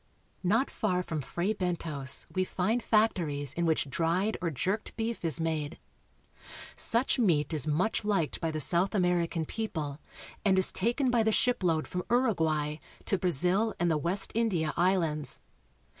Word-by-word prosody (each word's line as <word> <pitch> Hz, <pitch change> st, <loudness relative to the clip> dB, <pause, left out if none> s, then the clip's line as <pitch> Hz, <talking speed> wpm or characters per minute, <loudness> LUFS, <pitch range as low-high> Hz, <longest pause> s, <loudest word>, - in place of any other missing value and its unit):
Not 220 Hz, +9 st, +1 dB
far 180 Hz, -4 st, -1 dB
from 160 Hz, -4 st, -4 dB
Fray 175 Hz, -, -2 dB
Bentos 165 Hz, -8 st, -1 dB
we 185 Hz, -, +1 dB
find 195 Hz, +6 st, -1 dB
factories 165 Hz, -, +1 dB
in 170 Hz, +1 st, -1 dB
which 160 Hz, -2 st, +1 dB
dried 170 Hz, +8 st, 0 dB
or 170 Hz, -, 0 dB
jerked 190 Hz, -, -3 dB
beef 230 Hz, -2 st, -3 dB
is 165 Hz, 0 st, 0 dB
made. 160 Hz, -2 st, -2 dB, 1.0 s
Such 245 Hz, +3 st, +1 dB
meat 165 Hz, -, +2 dB
is 155 Hz, -1 st, 0 dB
much 180 Hz, +10 st, 0 dB
liked 200 Hz, -7 st, -1 dB
by 165 Hz, -, 0 dB
the 155 Hz, -1 st, -3 dB
South 175 Hz, +7 st, +2 dB
American 175 Hz, -3 st, +1 dB
people, 155 Hz, -9 st, -4 dB, 0.4 s
and 190 Hz, -2 st, +3 dB
is 190 Hz, -, +4 dB
taken 240 Hz, +6 st, +1 dB
by 240 Hz, -2 st, +3 dB
the 220 Hz, 0 st, +2 dB
ship 245 Hz, +1 st, +1 dB
load 165 Hz, -4 st, +1 dB
from 180 Hz, -, -3 dB
Uruguay 160 Hz, -, +1 dB, 0.3 s
to 195 Hz, -, +1 dB
Brazil 185 Hz, +6 st, +3 dB
and 175 Hz, -2 st, +2 dB
the 155 Hz, -, +2 dB
West 180 Hz, +6 st, +1 dB
India 190 Hz, -9 st, 0 dB
Islands. 170 Hz, -4 st, 0 dB
180 Hz, 160 wpm, -29 LUFS, 160-210 Hz, 1.0 s, is